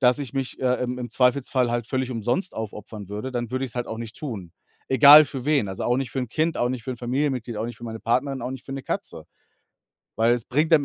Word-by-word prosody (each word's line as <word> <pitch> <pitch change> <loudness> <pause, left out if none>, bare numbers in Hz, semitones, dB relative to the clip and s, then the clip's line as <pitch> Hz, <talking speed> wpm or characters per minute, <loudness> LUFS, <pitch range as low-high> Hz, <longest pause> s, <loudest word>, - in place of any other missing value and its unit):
dass 125 +1 +4
ich 140 -3 -5
mich, 135 -2 -3
äh, 125 -1 +2
im 125 0 -2
im 120 -1 -5
Zweifelsfall 125 -1 +2
halt 120 -2 -1
völlig 130 0 -2
umsonst 120 - -1
aufopfern 105 -2 -7
würde, 105 +6 -5
dann 120 -2 -3
würde 130 +1 -1
ich 120 - -8
es - - -13
halt 120 - -2
auch 110 - -5
nicht 115 -2 -7
tun." 105 - -6 0.4
Egal 145 +3 +9
für 130 -2 -6
wen, 145 -9 +2
also, 95 - -4
auch 120 +1 +2
nicht 135 -3 -3
für 135 - -3
'n 125 - -3
Kind, 160 +5 0
auch 120 +1 +1
nicht 125 -3 -4
für 130 - -3
'n - - -7
Familienmitglied, 125 -2 -2
auch 110 - -2
nicht 120 -2 -7
für 120 - -11
meine 110 -1 -6
Partnerin, 130 +3 0
auch 125 - -3
nicht 130 -1 -7
für 135 - -7
'ne 135 -1 -5
Katze. - - -4 0.9
Weil 115 +2 +4
es 120 - -4
bringt 155 +5 +1
am 150 -3 +6
125 Hz, 265 wpm, -24 LUFS, 115-135 Hz, 0.9 s, Egal